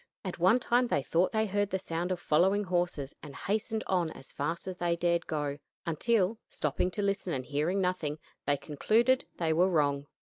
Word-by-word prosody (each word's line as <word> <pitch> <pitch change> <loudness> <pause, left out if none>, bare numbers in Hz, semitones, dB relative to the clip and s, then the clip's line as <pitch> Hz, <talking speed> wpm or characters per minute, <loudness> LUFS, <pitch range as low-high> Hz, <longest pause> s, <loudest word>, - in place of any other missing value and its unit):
At 180 -2 -4
one 185 +8 +5
time 245 0 +2
they 145 - +1
thought 175 +6 +2
they 220 -1 +2
heard 205 0 0
the 190 - 0
sound 175 0 -3
of 180 - -1
following 185 +6 +3
horses, 175 -7 -1
and 145 -2 -10
hastened 220 +2 -1
on 180 -3 +1
as 135 - -11
fast 165 +6 -3
as 185 -1 -4
they 175 -1 +1
dared 170 0 +1
go, 145 -2 -2 0.3
until, 200 +5 +1
stopping 150 +4 -1
to 205 +2 -3
listen 195 -3 0
and 130 -1 -3
hearing 150 +7 0
nothing, 180 -5 -1 0.3
they 145 0 +3
concluded 230 - +2
they 160 -2 +1
were 180 +4 +4
wrong. 145 -4 +1
175 Hz, 195 wpm, -30 LUFS, 155-200 Hz, 0.3 s, one